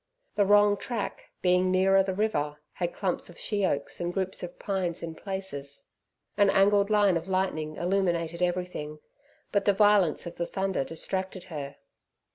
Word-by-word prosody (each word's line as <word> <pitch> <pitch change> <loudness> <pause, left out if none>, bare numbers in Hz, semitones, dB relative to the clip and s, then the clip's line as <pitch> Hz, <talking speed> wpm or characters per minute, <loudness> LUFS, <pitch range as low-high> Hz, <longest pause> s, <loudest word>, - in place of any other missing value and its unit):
The 205 - +3
wrong 205 0 +5
track, 230 -1 -5
being 180 0 +3
nearer 190 +1 +4
the 190 -1 -2
river, 150 -9 0 0.2
had 175 -1 -2
clumps 185 -2 -2
of 175 - -13
sheoaks 190 -10 -1
and 175 0 -1
groups 190 0 -3
of 180 0 -7
pines 185 -4 -2
in 165 -1 -4
places. 160 -7 -6 0.5
An 205 -1 +5
angled 200 +1 +4
line 205 -4 +4
of 165 +2 -6
lightning 185 -5 -1
illuminated 175 -2 0
everything, 175 -4 -2 0.5
but 200 -1 +1
the 205 - +5
violence 205 -6 +4
of 170 - -7
the 170 - -2
thunder 190 -6 -1
distracted 185 +5 -4
her. 140 -2 -5
185 Hz, 155 wpm, -28 LUFS, 170-195 Hz, 0.5 s, wrong